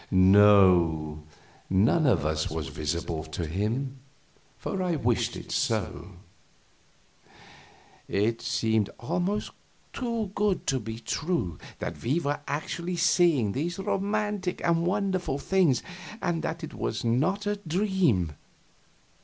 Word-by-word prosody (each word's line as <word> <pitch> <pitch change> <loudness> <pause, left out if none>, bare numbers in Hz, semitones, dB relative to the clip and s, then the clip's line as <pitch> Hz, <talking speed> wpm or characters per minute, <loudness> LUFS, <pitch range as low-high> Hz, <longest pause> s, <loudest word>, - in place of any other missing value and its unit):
"No, 95 -5 +5 0.5
none 110 - +3
of 95 - +3
us 80 0 0
was 75 -3 -4
visible 80 +2 -3
to 80 +2 -4
him, 115 - -2 0.6
for 195 - -3
I 180 -2 0
wished 120 -5 0
it - - -8
so." 90 +4 -1 1.9
It 110 +3 0
seemed 110 -2 +1
almost 180 - -1 0.4
too 230 -5 -2
good 205 -3 0
to 135 - +1
be 110 0 -6
true, 120 - -2 0.2
that - - -5
we 135 +8 +1
were 145 -2 -1
actually 170 +4 -3
seeing 170 - +3
these 165 - -2
romantic 200 0 -1
and 170 0 +2
wonderful 185 -6 0
things, 165 -5 +2 0.4
and 175 -5 -1
that 165 +1 -4
it 160 - -6
was 110 +1 -3
not 155 - +1
a 205 0 0
dream. 175 - +1
135 Hz, 120 wpm, -27 LUFS, -, 1.9 s, No